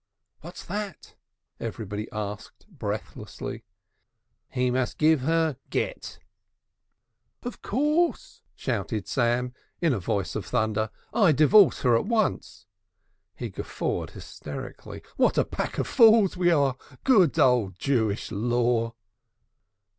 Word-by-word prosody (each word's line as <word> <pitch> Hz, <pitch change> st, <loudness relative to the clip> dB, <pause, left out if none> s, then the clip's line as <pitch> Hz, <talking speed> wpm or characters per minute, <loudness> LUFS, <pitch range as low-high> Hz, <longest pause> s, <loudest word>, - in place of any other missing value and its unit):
"What's 170 Hz, +3 st, -10 dB
that?" 200 Hz, -2 st, -6 dB, 0.5 s
everybody 110 Hz, -2 st, -5 dB
asked 105 Hz, 0 st, -6 dB
breathlessly. 110 Hz, -, -6 dB, 0.8 s
"He 125 Hz, 0 st, 0 dB
must 125 Hz, 0 st, -1 dB
give 155 Hz, -1 st, +4 dB
her 160 Hz, -1 st, +1 dB
Gett!" -, -, -3 dB, 1.3 s
"Of 245 Hz, -1 st, -6 dB
course!" 300 Hz, +8 st, 0 dB
shouted 105 Hz, -, -3 dB
Sam 125 Hz, 0 st, 0 dB, 0.3 s
in 165 Hz, -5 st, +2 dB
a 115 Hz, -, -1 dB
voice 95 Hz, +1 st, -2 dB
of -, -, -2 dB
thunder. 110 Hz, 0 st, 0 dB, 0.2 s
"I 205 Hz, -8 st, +5 dB
divorce 160 Hz, +6 st, +5 dB
her 120 Hz, -3 st, +4 dB
at 115 Hz, -, 0 dB
once." 230 Hz, -2 st, -1 dB, 0.7 s
He -, -, -5 dB
guffawed -, -, -3 dB
hysterically: -, -, -9 dB
"What -, -, +3 dB
a -, -, +3 dB
pack -, -, -4 dB
of -, -, 0 dB
fools 225 Hz, -6 st, +5 dB
we 180 Hz, -1 st, +2 dB
are! 140 Hz, -6 st, +2 dB, 0.3 s
Good 195 Hz, -, +4 dB
old 115 Hz, -8 st, +3 dB
Jewish 110 Hz, -5 st, 0 dB
law!" 115 Hz, +1 st, 0 dB
130 Hz, 115 wpm, -26 LUFS, 110-180 Hz, 1.3 s, I